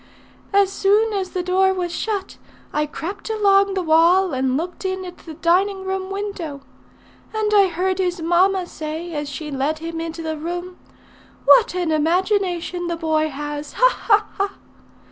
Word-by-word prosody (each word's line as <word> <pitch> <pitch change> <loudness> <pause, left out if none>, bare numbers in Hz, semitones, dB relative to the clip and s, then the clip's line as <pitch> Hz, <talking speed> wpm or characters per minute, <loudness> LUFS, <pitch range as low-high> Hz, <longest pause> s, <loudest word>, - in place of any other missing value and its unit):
As 395 -1 +3
soon 420 +3 +2
as 385 -2 -2
the 360 - -3
door 380 +1 +2
was 355 -2 -2
shut, 400 +2 -3 0.4
I 300 0 0
crept 375 +9 -6
along 395 -2 +3
the 375 - 0
wall 340 +3 +4
and 260 0 +1
looked 355 +5 -5
in 375 0 -2
at 355 -1 -9
the 320 -2 -10
dining 380 +4 +1
room 380 0 -3
window. 390 -8 -5 0.7
And 425 -1 0
I 400 -2 +6
heard 370 +2 -1
his 360 -1 0
mamma 360 +3 +2
say, 320 +1 -6
as 295 -1 -3
she 300 +2 -6
led 280 +3 -1
him 330 +1 -5
into 330 0 -5
the 315 -1 -3
room, 350 +3 -5 0.7
'What 470 -6 +6
an 350 -3 0
imagination 350 +2 0
the 340 - -1
boy 315 -1 +1
has!' 295 +1 -6
Ha! - - +5 0.2
ha! 420 -1 +5
ha! 395 0 -1
360 Hz, 165 wpm, -21 LUFS, 320-390 Hz, 0.7 s, I